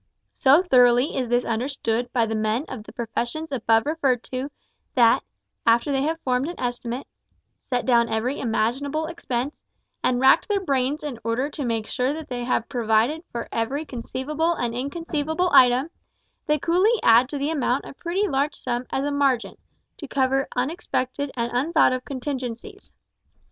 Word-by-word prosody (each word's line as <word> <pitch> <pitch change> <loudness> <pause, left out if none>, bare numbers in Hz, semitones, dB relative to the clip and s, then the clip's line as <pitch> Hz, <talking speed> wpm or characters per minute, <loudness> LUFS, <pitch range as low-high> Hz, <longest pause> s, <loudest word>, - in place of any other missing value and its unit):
So 280 +6 +5
thoroughly 250 -3 +4
is 255 -3 -1
this 245 +1 +2
understood 240 0 -2
by 235 -3 +2
the 225 - -3
men 220 +5 0
of 220 -5 -8
the - - -11
professions 240 +7 -4
above 225 -3 +2
referred 280 -6 0
to, 260 +2 -3 0.5
that, 235 -3 +5 0.4
after 235 +5 +3
they 270 -1 +1
have 320 +3 -1
formed 255 +2 0
an 345 - -7
estimate, 245 +1 -3 0.5
set 250 -2 -2
down 235 -2 +3
every 240 +5 -1
imaginable 265 +7 -1
expense, 280 -4 -4 0.4
and 245 -1 +2
racked 265 +1 +5
their 410 -2 +1
brains 280 -4 -1
in 275 -6 -5
order 240 +6 -1
to 285 -3 -4
make 225 -2 -1
sure 255 +5 -1
that 315 0 -7
they 245 -1 -3
have 240 -2 0
provided 240 +5 +1
for 235 - -4
every 270 +7 -2
conceivable 295 +6 -2
and 240 -5 -2
inconceivable 315 +5 -2
item, 255 +5 +5 0.6
they 300 - +3
coolly 370 - +2
add 235 +3 +6
to 290 - -4
the 285 +3 -1
amount 275 -3 0
a - - -9
pretty 360 +8 -1
large 280 -1 0
sum 245 0 -3
as 270 - -1
a 290 - -1
"margin" 275 -4 +1 0.4
to 295 - -8
cover 270 0 +1
unexpected 265 0 -2
and 235 -1 -2
unthought 290 +3 +3
of 255 0 -3
contingencies. 265 - -6
260 Hz, 165 wpm, -24 LUFS, 240-295 Hz, 0.6 s, add